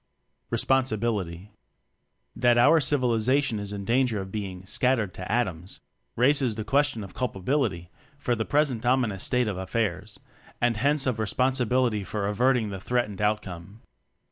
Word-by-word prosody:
Responsibility. 110 -8 0 0.8
That 120 -1 +3
our 145 +7 +6
Civilization 130 -3 +1
is 100 0 -6
in 100 -1 -5
danger 120 -1 +1
of 95 0 -6
Toeing 95 -3 -5
"shattered 125 -7 +1
to 95 - -6
atoms," 95 -7 -2 0.4
raises 130 -2 +2
the 110 - -4
question 140 0 +1
of 95 - -10
culpability 100 - -1 0.3
for 125 -3 -1
the 110 -1 -1
present 140 -4 0
ominous 120 -6 +1
state 125 -2 +1
of 100 -3 -3
affairs, 100 0 -3 0.4
and 120 -1 +2
hence 140 +4 +1
of 125 -4 -1
responsibility 125 -1 +1
for 100 +1 -3
averting 115 +1 +1
the 95 - -5
threatened 110 -4 -1
outcome. 105 -1 -3
115 Hz, 140 wpm, -26 LUFS, 100-130 Hz, 0.8 s, our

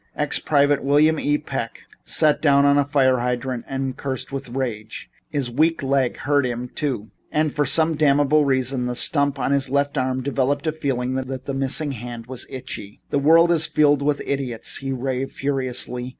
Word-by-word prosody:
Ex 150 -1 +1
private 145 -2 +2
William 150 +3 +3
E. 145 0 +1
Peck - - -5 0.2
sat 155 -2 +2
down 140 -2 +4
on 140 0 +5
a 145 - +4
fire 135 -3 +2
hydrant 125 0 -2
and 135 -1 -3
cursed 130 -2 -4
with 135 -2 -5
rage. 120 -4 -5 0.2
His 140 -5 -2
weak 155 +4 +1
leg 135 -2 +1
hurt 145 -1 +1
him, 125 0 -3
too, 120 -8 -4 0.2
and 155 -1 +1
for 145 -2 0
some 160 +3 +3
damnable 145 0 +3
reason, 130 -2 0
the 125 - -3
stump 140 +2 +1
of 135 - -1
his 140 -2 +1
left 140 +1 0
arm 130 0 -1
developed 140 +2 0
the 155 - +1
feeling 130 -5 -2
that 130 0 -3
his 130 -1 -6
missing 135 +2 0
hand 120 -2 -7
was 125 0 -7
itchy. 105 -5 -8
"The 145 - +2
world 165 +4 +5
is 160 -2 +3
filled 145 -2 +3
with 145 0 0
idiots," 130 -5 -2
he 135 0 -4
raved 130 +1 -3
furiously. 130 -2 -3
135 Hz, 185 wpm, -22 LUFS, 130-145 Hz, 0.2 s, on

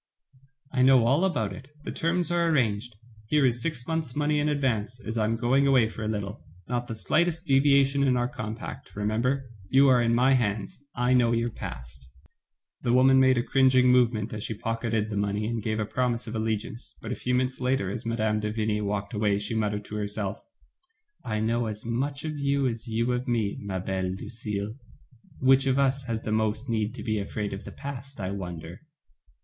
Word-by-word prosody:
"I 130 - +1
know 130 -2 +6
all 140 +9 +3
about 125 - 0
it, 125 +8 -10 0.2
the - - -4
terms 175 +1 0
are 170 -1 +2
arranged. 120 -6 0 0.3
Here 150 +3 +3
is 120 -1 +1
six 140 -6 -3
months* 160 -5 -2
money 150 0 +1
in 150 +1 +1
advance, 120 -5 -1
as 115 -2 -5
I 110 -2 +1
am 115 +1 +1
going 130 +4 +2
away 130 -5 +4
for 110 - -8
a 105 - -2
little. 105 0 -4 0.2
Not 120 0 -2
the 115 - -5
slightest 170 - +1
devia 140 0 +5
tion 140 +1 -1
in 130 -2 +3
our 120 0 +1
compact, 110 -3 -7
remember. 115 +5 -1 0.2
You 135 +1 +6
are 125 -2 +5
in 115 0 +2
my 130 +3 +4
hands, 110 0 -1
I 125 +1 +2
know 120 -2 +4
your 115 0 0
past." 65 - -8 0.7
The 120 - +1
woman 130 +1 +6
made 130 -1 +5
a 120 - +2
cringing 130 -1 +4
movement 115 -3 +2
as 105 -1 -4
she 110 - -3
pocketed 115 -1 -2
the 105 - -2
money, 100 +1 0
and 115 0 -2
gave 110 +1 -2
a 105 - 0
promise 120 +1 -1
of 110 - -6
allegiance, 110 +1 -3
but 115 - -6
a - - -1
few 125 0 -1
minutes 130 +1 -1
later, 125 -7 0
as 120 +3 -5
Mme. 110 -2 0
de 105 0 -2
Vigny 105 -1 -1
walked 100 0 -3
away, 105 -2 +1
she 105 +3 -3
muttered 105 -2 -1
to 105 - -6
herself: 105 -1 -3 0.8
"I 110 -1 -2
know 115 +1 0
as 105 +1 -6
much 140 +5 -2
of 155 -2 -4
you 140 0 +1
as 115 0 -4
you 115 +2 0
of 125 +1 -2
me, 115 -4 0
ma 100 -2 -3
belle 95 0 -2
Lucille. 105 -1 -5 0.6
Which 135 +1 +5
of 130 0 +2
us 135 0 +2
has 115 -2 -3
the 110 - -3
most 110 +2 0
need 110 -1 -1
to - - -7
be 110 -2 0
afraid 100 0 -3
of 100 - -7
the - - -7
past, 135 0 -8
I 95 -1 -3
wonder?" 90 -3 -6
115 Hz, 210 wpm, -27 LUFS, 105-130 Hz, 0.8 s, know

